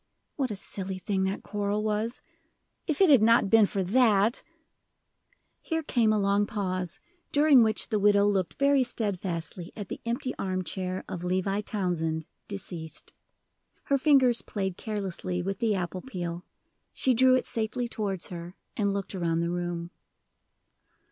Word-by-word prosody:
What 270 Hz, -3 st, -1 dB
a 210 Hz, -, -3 dB
silly 190 Hz, -1 st, -5 dB
thing 190 Hz, 0 st, -1 dB
that 190 Hz, +1 st, -3 dB
quarrel 205 Hz, 0 st, -2 dB
was! 215 Hz, +3 st, -2 dB, 0.7 s
If 310 Hz, -1 st, -1 dB
it 380 Hz, -, +6 dB
had 265 Hz, -6 st, +7 dB
not 225 Hz, -2 st, +4 dB
been 225 Hz, -2 st, +6 dB
for 195 Hz, -1 st, -1 dB
that 215 Hz, +1 st, +3 dB, 0.6 s
" -, -, -44 dB
Here 325 Hz, -1 st, -2 dB
came 235 Hz, -6 st, +2 dB
a 215 Hz, -, +2 dB
long 200 Hz, 0 st, +2 dB
pause, 185 Hz, -3 st, -3 dB, 0.3 s
during 290 Hz, -3 st, +6 dB
which 220 Hz, -2 st, +2 dB
the 215 Hz, -3 st, +1 dB
widow 205 Hz, 0 st, +4 dB
looked 190 Hz, -6 st, 0 dB
very 280 Hz, -1 st, +4 dB
steadfastly 185 Hz, -7 st, -3 dB
at 205 Hz, -4 st, -7 dB
the -, -, -6 dB
empty 250 Hz, +2 st, -2 dB
arm 185 Hz, -1 st, -1 dB
chair 185 Hz, 0 st, -3 dB
of 175 Hz, -1 st, -6 dB
Levi 185 Hz, +3 st, 0 dB
Townsend, 170 Hz, -6 st, -2 dB, 0.2 s
deceased. 175 Hz, -6 st, -6 dB, 0.7 s
Her 280 Hz, -, +2 dB
fingers 260 Hz, -4 st, +4 dB
played 190 Hz, -3 st, -3 dB
carelessly 185 Hz, -4 st, -3 dB
with 195 Hz, +1 st, -3 dB
the 220 Hz, -3 st, +1 dB
apple 185 Hz, 0 st, -3 dB
peel: 175 Hz, -7 st, -5 dB, 0.5 s
she 260 Hz, -, +2 dB
drew 255 Hz, +2 st, +5 dB
it 255 Hz, -, 0 dB
safely 230 Hz, +2 st, -2 dB
towards 200 Hz, -6 st, -3 dB
her, 175 Hz, +1 st, -8 dB, 0.2 s
and 200 Hz, -2 st, +1 dB
looked 200 Hz, 0 st, -3 dB
around 170 Hz, -3 st, 0 dB
the 170 Hz, 0 st, -1 dB
room. 175 Hz, -1 st, -3 dB
200 Hz, 155 wpm, -28 LUFS, 185-230 Hz, 0.7 s, had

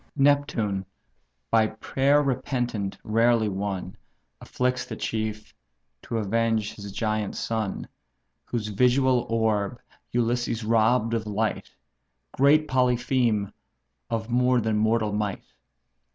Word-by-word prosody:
Neptune, 135 Hz, -9 st, +2 dB, 0.7 s
by 110 Hz, -1 st, +4 dB
prayer 135 Hz, +6 st, +1 dB
repentant 125 Hz, -6 st, -2 dB
rarely 115 Hz, 0 st, +3 dB
won, 95 Hz, -2 st, -3 dB, 0.5 s
Afflicts 125 Hz, 0 st, -1 dB
the 110 Hz, -, -7 dB
chief, 110 Hz, -1 st, -4 dB, 0.5 s
to 115 Hz, -, -4 dB
avenge 110 Hz, 0 st, 0 dB
his 100 Hz, -1 st, -9 dB
giant 110 Hz, -1 st, -2 dB
son, 110 Hz, -4 st, -3 dB, 0.6 s
Whose 110 Hz, -3 st, -3 dB
visual 125 Hz, +3 st, +2 dB
orb 110 Hz, 0 st, 0 dB, 0.3 s
Ulysses 120 Hz, -1 st, 0 dB
robb'd 115 Hz, +1 st, +2 dB
of 110 Hz, -2 st, -1 dB
light; 105 Hz, +1 st, -2 dB, 0.6 s
Great 150 Hz, +3 st, +4 dB
Polypheme, 125 Hz, -5 st, +1 dB, 0.6 s
of 115 Hz, -1 st, -2 dB
more 125 Hz, +1 st, +3 dB
than 110 Hz, -1 st, 0 dB
mortal 110 Hz, 0 st, +1 dB
might? 105 Hz, -2 st, -2 dB
115 Hz, 105 wpm, -26 LUFS, 105-125 Hz, 0.7 s, by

